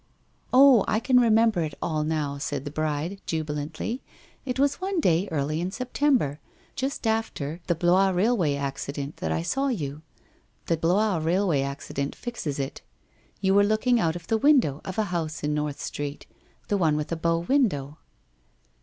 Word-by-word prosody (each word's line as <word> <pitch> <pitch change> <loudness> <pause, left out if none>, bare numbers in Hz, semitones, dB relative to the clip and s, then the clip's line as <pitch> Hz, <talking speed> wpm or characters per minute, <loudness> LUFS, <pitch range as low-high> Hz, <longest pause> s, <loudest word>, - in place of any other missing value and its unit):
' - - -40
Oh, 260 -4 +7
I 215 - +2
can 250 +1 +4
remember 225 -4 +4
it 155 -3 -3
all 155 -2 -1
now,' 150 -2 -2
said 140 -2 -3
the 145 - -5
bride, 155 +5 -2
jubi 160 -2 -2
lantly. 155 - -4 0.2
' - - -30
It 250 - -1
was 280 +5 +1
one 380 -1 -1
day 180 - +2
early 155 +1 -1
in 180 - -1
September, 250 - 0 0.4
just 270 -2 -3
after 200 -9 -1
the 175 - +2
Blois 180 +4 +3
railway 185 -5 +2
accident, 140 +1 -4
that 80 - -3
I 80 +1 -1
saw 275 - 0
you. 150 - -3 0.6
The 165 - +1
Blois 185 +4 +2
rail 180 +6 +1
way 145 -6 +2
accident 140 0 -4
fixes 230 - -4
it. 135 -1 -4 0.6
You 190 -1 +3
were 200 +1 +6
looking 215 +4 +2
out 165 -5 +1
of 170 -1 -7
the 220 +3 +1
window 250 - +3
of 190 - -6
a 220 - +3
house 160 -3 -3
in 150 0 0
North 150 -1 -2
Street 145 0 -5 0.2
— - - -35
the 205 - +1
one 155 -4 +2
with 150 +2 -4
a - - +1
bow 165 +1 +1
window.' 170 - 0
170 Hz, 185 wpm, -26 LUFS, 150-220 Hz, 0.6 s, Oh